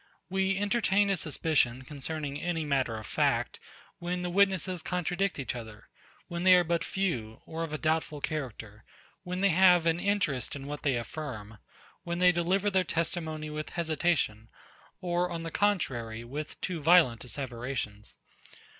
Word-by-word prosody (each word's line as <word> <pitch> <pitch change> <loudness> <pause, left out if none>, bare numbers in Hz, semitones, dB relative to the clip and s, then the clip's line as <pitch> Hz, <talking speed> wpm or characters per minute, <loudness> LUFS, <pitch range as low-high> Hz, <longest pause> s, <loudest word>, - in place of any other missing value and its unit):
We 190 0 +1
entertain 205 -1 +2
a - - +3
suspicion 145 -6 0
concerning 145 +1 -5
any 165 -3 -1
matter 130 -6 0
of 110 - -7
fact, - - 0 0.4
when 180 +1 -2
the 180 - -2
witnesses 190 -2 +2
contradict 180 +2 -1
each 135 - -3
other; 110 -2 -9 0.4
when 170 -1 -4
they 185 0 +8
are 180 - +5
but 170 0 0
few, 125 - -2
or 160 +1 -5
of 165 - -4
a 155 - -2
doubtful 155 -1 0
character; 115 -8 -5 0.4
when 180 0 -4
they 200 - +5
have 180 -1 +6
an 165 0 +2
interest 175 - 0
in 140 -1 -7
what 145 +1 -5
they 140 -3 +1
affirm; 115 -4 -6 0.4
when 170 0 -3
they 180 0 +6
deliver 185 +4 +1
their 190 -1 +3
testimony 160 -2 -2
with 155 0 -4
hesitation, 155 -9 0 0.5
or 175 0 0
on 165 -1 -4
the 165 - -5
contrary, 120 - 0
with 145 +6 -6
too 175 -4 -3
violent 155 -8 +5
asseverations. 120 -5 -5
160 Hz, 155 wpm, -30 LUFS, 130-180 Hz, 0.5 s, they